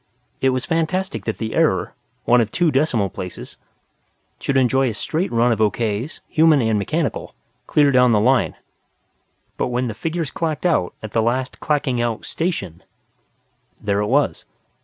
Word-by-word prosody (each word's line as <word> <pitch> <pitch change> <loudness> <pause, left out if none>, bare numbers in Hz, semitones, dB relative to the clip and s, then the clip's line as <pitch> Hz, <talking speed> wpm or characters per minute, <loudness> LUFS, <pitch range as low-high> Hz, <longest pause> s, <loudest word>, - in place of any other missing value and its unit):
It 135 - +4
was 130 -1 -1
fantastic 185 +4 -1
that 110 - -2
the 110 -1 -4
error - - +1 0.3
one 125 0 +5
of 110 -2 -2
two 170 -3 +2
decimal 130 -8 +1
places 90 -1 -8 0.8
should 135 - 0
enjoy 130 0 +3
a 110 - -5
straight 160 - -2
run 120 +1 +3
of 115 - 0
okays, 110 - -1
human 160 -2 +4
and 110 -3 +1
mechanical, 155 +8 -2 0.3
clear 145 -2 +4
down 125 -2 +5
the 105 - +4
line; 125 +4 +2 1.0
but - - 0
when 125 +1 -1
the 110 - -3
figures 165 +4 -3
clacked 160 0 -3
out 150 - +1
at 110 - -6
the 115 - +1
last 125 +4 -1
clacking 140 -5 0
out 120 -2 -2
station, 100 - -3 1.0
there 100 -1 0
it 105 - 0
was. 140 +5 +1
125 Hz, 160 wpm, -21 LUFS, 110-155 Hz, 1.0 s, one